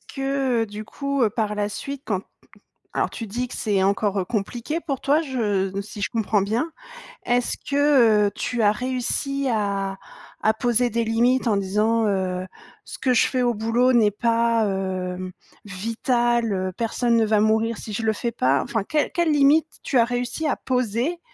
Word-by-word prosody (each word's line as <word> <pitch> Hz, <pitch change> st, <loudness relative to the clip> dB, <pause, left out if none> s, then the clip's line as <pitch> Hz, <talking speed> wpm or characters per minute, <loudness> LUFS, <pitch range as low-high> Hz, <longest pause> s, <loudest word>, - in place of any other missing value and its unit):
que 270 Hz, -4 st, -1 dB
du 210 Hz, 0 st, -8 dB
coup 280 Hz, +2 st, -2 dB
par 215 Hz, -2 st, -1 dB
la 205 Hz, 0 st, -1 dB
suite 275 Hz, +5 st, -6 dB
quand 195 Hz, -3 st, -2 dB, 0.7 s
alors -, -, 0 dB
tu 225 Hz, -, -6 dB
dis 240 Hz, +5 st, -3 dB
que -, -, -9 dB
c'est 205 Hz, -3 st, 0 dB
encore 195 Hz, -1 st, +1 dB
compliqué 240 Hz, +8 st, -3 dB
pour 275 Hz, -6 st, -4 dB
toi 295 Hz, +3 st, +3 dB
je 205 Hz, -9 st, -1 dB
si 210 Hz, +1 st, -10 dB
je -, -, 0 dB
comprends 220 Hz, -3 st, +1 dB
bien, 230 Hz, +11 st, -1 dB, 0.5 s
est-ce 245 Hz, 0 st, +1 dB
que, 270 Hz, -7 st, +3 dB
heu, -, -, -2 dB
tu 245 Hz, -2 st, -2 dB
as 205 Hz, -, +5 dB
réussi 260 Hz, +3 st, -2 dB
à 200 Hz, -3 st, -1 dB, 0.5 s
à 220 Hz, -, +4 dB
poser 240 Hz, +2 st, +1 dB
des 230 Hz, +1 st, -1 dB
limites? 240 Hz, +3 st, +2 dB
En 215 Hz, -, +3 dB
disant, 210 Hz, +4 st, +1 dB
heu: 185 Hz, -2 st, -1 dB, 0.4 s
«Ce -, -, -9 dB
que 255 Hz, -1 st, +2 dB
je 240 Hz, -, +4 dB
fais 255 Hz, -1 st, 0 dB
au 240 Hz, -, +2 dB
boulot 230 Hz, +4 st, +2 dB
n'est 215 Hz, -3 st, +4 dB
pas, 230 Hz, 0 st, +1 dB
heu, 185 Hz, -1 st, -3 dB, 0.3 s
vital, 230 Hz, +3 st, 0 dB
heu, 185 Hz, -1 st, -1 dB
personne 235 Hz, +1 st, 0 dB
ne 225 Hz, -, +4 dB
va 215 Hz, -1 st, +2 dB
mourir 220 Hz, +1 st, +2 dB
si 215 Hz, -, -7 dB
je 225 Hz, -, -3 dB
le 220 Hz, -, +2 dB
fais 235 Hz, +2 st, -3 dB
pas». 135 Hz, +2 st, +2 dB
Enfin 225 Hz, -4 st, -2 dB
quelles 300 Hz, +7 st, 0 dB
quelles 340 Hz, -2 st, +2 dB
limites 295 Hz, +2 st, +3 dB
tu 270 Hz, -, 0 dB
as 235 Hz, -, +6 dB
réussi 245 Hz, +5 st, -3 dB
à 285 Hz, -, 0 dB
poser 250 Hz, +6 st, -1 dB
230 Hz, 180 wpm, -23 LUFS, 205-250 Hz, 0.7 s, as